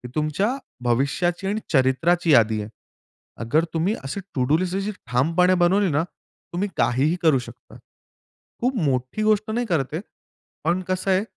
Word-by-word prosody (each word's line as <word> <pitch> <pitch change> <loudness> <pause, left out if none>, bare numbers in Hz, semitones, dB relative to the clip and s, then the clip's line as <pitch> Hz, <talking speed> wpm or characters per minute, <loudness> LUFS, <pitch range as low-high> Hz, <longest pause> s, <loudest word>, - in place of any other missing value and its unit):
तुमच्या 155 +6 0 0.4
भविष्याची 140 +10 0
आणि 210 +2 -1
चरित्राची 160 +6 +3
यादी 110 -5 +4
आहे. 105 - -7 0.7
अगर 150 +8 +2
तुम्ही 175 +7 +1
असे 135 +9 -4 0.2
टू 130 - +1
डू 155 - +5
लिस्ट 185 +1 -2 0.3
ठामपणे 165 +9 +3
बनवली 190 +2 +3
ना, 145 +3 +1 0.5
तुम्ही 185 +4 -1
काहीही 140 +7 +2
करू 155 -5 +4
शकता. 120 - -12 0.8
खूप 255 +2 0
मोठी 130 +7 -1
गोष्ट 215 0 +2
नाही 240 +2 -1
करत 150 - -1
आहे, 160 - -2 0.6
पण 170 +4 +1
कसं 185 +1 0
आहे 190 +2 +3
165 Hz, 150 wpm, -23 LUFS, 135-190 Hz, 0.8 s, डू